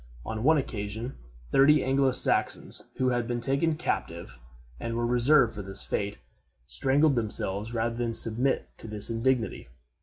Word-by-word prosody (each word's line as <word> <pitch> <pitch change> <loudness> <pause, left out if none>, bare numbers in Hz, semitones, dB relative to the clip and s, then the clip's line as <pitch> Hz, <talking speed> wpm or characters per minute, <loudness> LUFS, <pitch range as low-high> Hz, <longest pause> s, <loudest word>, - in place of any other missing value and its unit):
On 110 -1 -4
one 160 +3 +4
occasion, 110 -1 -4 0.4
thirty 140 +1 +5
Anglo 135 0 +2
Saxons, 130 - +1
who 130 0 +1
had 120 -2 -1
been 120 -1 -2
taken 140 +6 0
captive 85 - -4 0.4
and 115 0 -4
were 120 0 -1
reserved 120 +1 +3
for 105 - -6
this 95 0 0
fate, 100 0 -3 0.5
strangled 140 - +2
themselves 105 -2 -1
rather 115 0 -2
than 120 -1 -2
submit 115 +4 +1
to - - -10
this 105 +1 +1
indignity. 115 -1 -1
120 Hz, 150 wpm, -27 LUFS, 110-135 Hz, 0.5 s, thirty